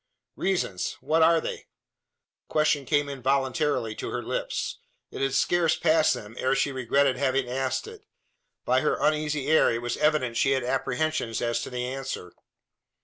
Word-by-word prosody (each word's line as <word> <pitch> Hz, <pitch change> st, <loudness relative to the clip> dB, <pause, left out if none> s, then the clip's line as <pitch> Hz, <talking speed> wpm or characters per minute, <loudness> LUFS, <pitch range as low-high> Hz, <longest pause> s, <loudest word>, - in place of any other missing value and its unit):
"Reasons! 175 Hz, -, -1 dB
What 160 Hz, +3 st, +1 dB
are 165 Hz, +1 st, +5 dB
they?" -, -, -4 dB
The -, -, -20 dB, 0.8 s
question 150 Hz, -2 st, +1 dB
came 145 Hz, +1 st, +1 dB
involuntarily 135 Hz, -2 st, 0 dB
to -, -, -4 dB
her -, -, -3 dB
lips. -, -, -3 dB, 0.3 s
It -, -, -6 dB
had 135 Hz, -1 st, 0 dB
scarce 175 Hz, 0 st, +2 dB
passed 160 Hz, -1 st, +3 dB
them, 105 Hz, +1 st, -9 dB
ere 130 Hz, +1 st, +1 dB
she 140 Hz, -, +1 dB
regretted 130 Hz, +1 st, +1 dB
having 135 Hz, -1 st, +1 dB
asked 130 Hz, -, -2 dB
it. 445 Hz, -1 st, -11 dB, 0.6 s
By -, -, +3 dB
her -, -, +1 dB
uneasy 150 Hz, -2 st, 0 dB
air 155 Hz, +2 st, +4 dB
it 115 Hz, +1 st, -3 dB
was 120 Hz, -, -2 dB
evident 150 Hz, -6 st, +1 dB
she 135 Hz, +2 st, +3 dB
had 130 Hz, -2 st, 0 dB
apprehensions 130 Hz, -1 st, -1 dB
as 120 Hz, 0 st, -1 dB
to -, -, -5 dB
the 125 Hz, -1 st, -3 dB
answer. 130 Hz, -9 st, -5 dB
135 Hz, 165 wpm, -26 LUFS, 125-155 Hz, 0.8 s, are